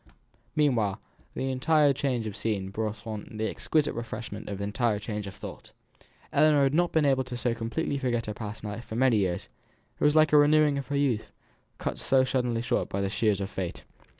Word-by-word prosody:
Meanwhile, 120 -10 +2 0.4
the 135 0 -1
entire 145 +2 +3
change 130 -5 -1
of 105 -2 -5
scene 105 -3 -2
brought 110 +1 -4
on 110 -1 -6
the 110 0 0
exquisite 155 +5 0
refreshment 110 -2 -6
of 100 -1 -4
entire 105 +2 0
change 105 -1 -4
of 95 - -8
thought. - - -10 0.6
Ellinor 150 -2 +5
had 135 0 +2
not 175 +2 +2
been 160 -2 +3
able 135 -2 +3
so 125 -1 -2
completely 120 +6 -2
to - - -6
forget 120 -3 0
her 105 - -4
past 105 0 -7
life 105 +2 -5
for 110 - -7
many 125 -1 +4
years; 90 -4 -1 0.5
it - - -2
was 150 +1 +4
like 155 -1 +5
a - - +8
renewing 150 -1 +5
of 135 - -6
her 145 - -1
youth; 130 -6 0 0.5
cut - - -3
so 135 -1 +3
suddenly 125 -3 0
short - - 0
by 100 - -2
the 100 -1 -1
shears 105 -1 +1
of 100 0 -4
Fate. 90 -3 -4
120 Hz, 205 wpm, -28 LUFS, 105-140 Hz, 0.6 s, a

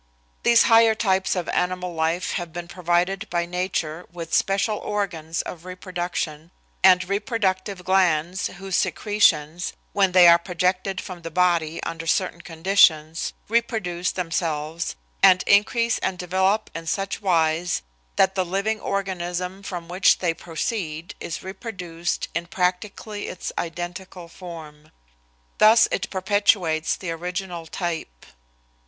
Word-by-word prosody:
These 235 -1 +5
higher 225 -1 +5
types 190 -4 +1
of 180 -2 -2
animal 180 0 -1
life 165 +2 0
have 175 -3 -4
been 175 +1 -6
provided 180 +3 0
by 170 0 0
nature 175 -2 -3
with 170 -2 -7
special 200 +2 +1
organs 170 -6 -3
of 170 -2 -8
reproduction 175 -4 -4 0.3
and 180 -1 +6
reproductive 200 -3 -1
glands 180 -1 +2
whose 195 0 -5
secretions, 175 -6 +1 0.2
when 195 -2 +3
they 180 -1 +8
are 170 0 +8
projected 185 +2 -1
from 180 -2 -8
the 165 - -6
body 170 -2 +1
under 165 0 -5
certain 175 -1 0
conditions, 165 -2 +2
reproduce 215 -6 0
themselves, 165 -2 -2 0.3
and 185 0 +6
increase 230 +3 +3
and 190 -1 -2
develop 190 +4 0
in 165 0 -7
such 195 +5 -2
wise 170 -2 +1 0.3
that 190 0 +3
the 190 - +1
living 200 +5 -1
organism 185 -1 -3
from 175 -4 -6
which 180 +2 +4
they 175 -3 0
proceed 165 0 -4
is 165 - -5
reproduced 180 -4 -4
in 170 +1 -3
practically 195 +4 -2
its 180 - -5
identical 175 +1 -5
form. 160 -4 -11 0.7
Thus 220 +2 +7
it 195 - -2
perpetuates 190 -4 +1
the 180 -3 -5
original 175 0 -5
type. 160 - -5
180 Hz, 125 wpm, -23 LUFS, 170-195 Hz, 0.7 s, they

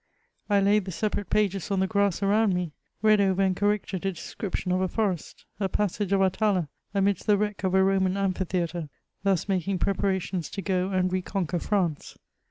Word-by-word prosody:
I 205 -1 +4
laid 205 0 +3
the 190 - -5
separate 205 +1 -2
pag^s 200 -3 0
on 195 -1 +1
the 190 - +3
grass 200 -1 +1
around 205 0 +3
me 180 -3 -2 0.2
— - - -48
read 215 -1 +5
over 195 0 +2
and 190 -1 +2
corrected 205 -2 -1
a 195 - 0
description 180 +2 -4
of 185 +1 +1
a 190 - +2
forest 190 -5 -2
— - - -40
a 195 -2 0
passage 205 0 -1
of 195 -1 +3
Atala^ 190 -3 +1 0.2
amidst 195 -1 0
the 210 -1 +5
wreck 210 -1 -2
of 190 0 +1
a 190 - +5
Roman 190 0 +2
amphitheatre, 180 -4 -1 0.3
thus 195 -2 +1
making 190 -1 0
pre 195 - +1
parations 190 -2 -1
to 200 - -3
go 185 0 0
and 185 -1 0
re 185 - +1
conquer 180 -2 -2
France. 175 -7 -1
195 Hz, 200 wpm, -26 LUFS, 185-200 Hz, 0.3 s, read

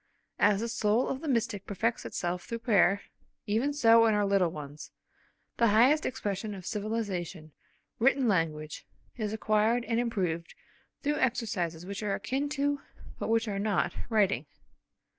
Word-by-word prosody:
As 205 0 +4
the 230 - -1
soul 225 +1 +1
of 265 - -3
the 320 - -5
mystic 230 -6 -1
perfects 225 +4 -1
itself 175 0 -3
through 230 - -4
prayer, 200 -3 +4 0.4
even 230 +7 +1
so 230 -5 +5
in 220 - +3
our 205 0 +2
little 195 -3 +3
ones, 150 -1 -8 0.7
that 235 - +4
highest 250 +9 +4
expression 210 -4 -3
of 185 -2 -10
civilisation, 195 -7 -3 0.5
written 265 +1 +3
language, 160 -5 -1 0.3
is 215 -3 -2
acquired 220 +2 +1
and 230 -1 0
improved 180 -8 -2 0.5
through 295 0 +1
exercises 180 -9 -1
which 200 +2 -5
are 205 -2 0
akin 265 +7 -2
to, 285 -1 0 0.4
but - - -3
which 225 0 +2
are 200 -2 -2
not, 200 -4 0 0.2
writing. 200 - +2
215 Hz, 150 wpm, -29 LUFS, 190-235 Hz, 0.7 s, so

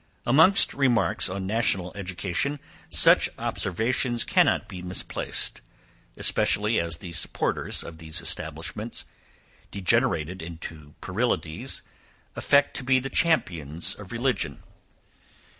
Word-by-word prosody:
Amongst 160 +11 +6
remarks 120 -7 +2
on 95 +1 -4
national 95 -4 0
education, 100 +8 -3 0.3
such - - +5
observations 120 +5 0
cannot - - +2
be 90 - -8
misplaced, 90 0 -2 0.6
especially 105 +2 +2
as 85 -2 -1
the 85 -1 -9
supporters 85 - -1
of 80 -1 -10
these 80 -1 -1
establishments, - - -3 0.6
degenerated 95 - 0
into 80 -3 -9
puerilities, 90 -6 -2 0.5
affect 140 0 +2
to - - -4
be 130 +1 +3
the 135 +1 -6
champions 85 - +1
of 100 -2 -11
religion. 115 - -2
95 Hz, 105 wpm, -25 LUFS, 85-120 Hz, 0.6 s, Amongst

